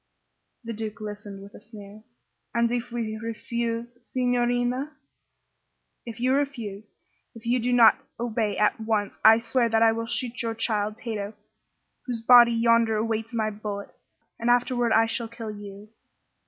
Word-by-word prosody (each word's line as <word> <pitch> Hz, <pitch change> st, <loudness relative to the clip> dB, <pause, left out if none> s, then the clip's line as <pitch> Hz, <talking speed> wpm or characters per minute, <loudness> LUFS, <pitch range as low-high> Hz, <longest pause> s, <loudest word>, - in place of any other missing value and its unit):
The 230 Hz, 0 st, -5 dB
Duke 220 Hz, 0 st, -5 dB
listened 205 Hz, -2 st, -8 dB
with 200 Hz, -, -13 dB
a -, -, -13 dB
sneer. 210 Hz, -1 st, -12 dB, 0.5 s
"And 235 Hz, 0 st, +2 dB
if 240 Hz, 0 st, -3 dB
we 225 Hz, -2 st, -3 dB
refuse, 230 Hz, +1 st, -4 dB
signorina?" 245 Hz, +2 st, 0 dB, 1.1 s
"If 230 Hz, -1 st, -7 dB
you 255 Hz, +2 st, +2 dB
refuse 230 Hz, -8 st, -3 dB, 0.5 s
if 230 Hz, -, -13 dB
you 245 Hz, +2 st, +2 dB
do 245 Hz, +1 st, -1 dB
not 235 Hz, -3 st, +6 dB, 0.2 s
obey 225 Hz, -3 st, -1 dB
at 210 Hz, +1 st, +2 dB
once 220 Hz, -2 st, -2 dB
I 220 Hz, +1 st, +8 dB
swear 235 Hz, +1 st, 0 dB
that 225 Hz, 0 st, +3 dB
I 225 Hz, -, +6 dB
will 230 Hz, 0 st, -3 dB
shoot 245 Hz, +1 st, -2 dB
your 230 Hz, -1 st, -2 dB
child, 215 Hz, -2 st, -1 dB
Tato, 215 Hz, -3 st, -5 dB, 0.7 s
whose 240 Hz, -2 st, -3 dB
body 240 Hz, 0 st, +8 dB
yonder 230 Hz, -1 st, +3 dB
awaits 225 Hz, +1 st, -2 dB
my 215 Hz, -1 st, 0 dB
bullet. 205 Hz, -1 st, -6 dB, 0.5 s
And 235 Hz, -, -1 dB
afterward 245 Hz, -1 st, +2 dB
I 225 Hz, 0 st, +5 dB
shall 225 Hz, +1 st, -2 dB
kill 225 Hz, -1 st, -7 dB
you." 205 Hz, 0 st, -10 dB
230 Hz, 155 wpm, -26 LUFS, 215-240 Hz, 1.1 s, I